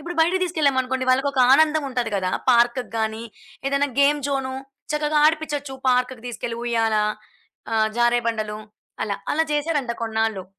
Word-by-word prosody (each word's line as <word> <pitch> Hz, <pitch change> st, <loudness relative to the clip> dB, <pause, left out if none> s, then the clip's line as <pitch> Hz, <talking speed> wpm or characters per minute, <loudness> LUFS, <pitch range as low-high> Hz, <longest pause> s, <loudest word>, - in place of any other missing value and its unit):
ఇప్పుడు 340 Hz, +4 st, -6 dB
బయటికి 360 Hz, +3 st, +3 dB
తీసుకెళ్ళామనుకోండి, 260 Hz, -6 st, 0 dB
వాళ్ళకి 270 Hz, +2 st, +2 dB
ఒక 260 Hz, -, +1 dB
ఆనందం 310 Hz, +1 st, +4 dB
ఉంటది 245 Hz, -4 st, -2 dB
కదా 185 Hz, -1 st, -1 dB, 0.2 s
పార్క్‌కి 240 Hz, +1 st, +3 dB
గాని, 220 Hz, +1 st, -2 dB, 0.4 s
ఏదైనా 280 Hz, +1 st, +1 dB
గేమ్ 290 Hz, +1 st, +4 dB
జోను 265 Hz, -1 st, -2 dB, 0.4 s
చక్కగా 300 Hz, 0 st, +1 dB
ఆడిపించొచ్చు 295 Hz, -3 st, -1 dB
పార్క్‌కి 250 Hz, -1 st, +1 dB
తీసుకెళ్లి 235 Hz, 0 st, -5 dB
ఉయ్యాల 225 Hz, -2 st, +1 dB, 0.8 s
ఆహ్, 220 Hz, 0 st, +3 dB
జారే 240 Hz, 0 st, +3 dB
బండలు 215 Hz, -2 st, -3 dB, 0.5 s
అలా. 200 Hz, -2 st, -3 dB, 0.2 s
అలా 320 Hz, +2 st, +2 dB
జేసారంట 295 Hz, -4 st, -1 dB
కొన్నాళ్ళు. 220 Hz, -4 st, -1 dB
260 Hz, 140 wpm, -22 LUFS, 230-295 Hz, 0.8 s, ఆనందం